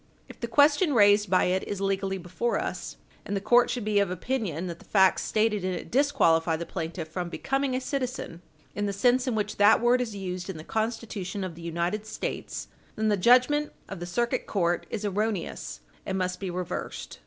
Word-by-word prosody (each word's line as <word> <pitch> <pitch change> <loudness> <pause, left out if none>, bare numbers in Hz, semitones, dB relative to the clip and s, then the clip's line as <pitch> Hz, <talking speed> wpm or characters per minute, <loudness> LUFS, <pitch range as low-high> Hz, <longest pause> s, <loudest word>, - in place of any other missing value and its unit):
If - - -13
the 235 - -3
question 290 +4 +4
raised 205 -2 +5
by 185 - +4
it 185 +1 +1
is 200 - -3
legally 195 0 -1
before 185 +7 -2
us, - - -5 0.3
and 200 - -2
the - - 0
court 240 +4 +4
should 245 -4 -2
be 210 -1 +2
of 200 -2 +2
opinion 185 - -2
that 170 -2 -6
the - - -17
facts 190 -2 +4
stated 215 -2 +1
in 185 0 -1
it 175 - -6
disqualify 170 - +3
the 170 +1 -4
plaintiff 165 -1 -5
from 175 +2 -4
becoming 270 +6 -1
a - - +1
citizen, 255 - -4 0.3
in 205 0 -2
the 200 - -2
sense 245 +6 +2
in 245 - 0
which 210 -1 -2
that 205 +2 +6
word 240 +2 +3
is 225 -4 -4
used 185 -1 -5
in 190 - -5
the 155 - -8
Constitution 215 -3 -3
of 185 -2 -4
the 165 - -12
United 170 +6 -2
States, - - -5 0.3
then 215 0 +1
the 210 - +3
judgment 255 +8 +4
of 195 - -7
the 175 - -5
Circuit 235 +7 -1
Court 175 -4 0
is 215 -2 -4
erroneous, 205 -1 -2 0.2
and 190 - -2
must 180 -1 -2
be 195 - -4
reversed. 180 0 -5
205 Hz, 205 wpm, -27 LUFS, 180-235 Hz, 0.3 s, that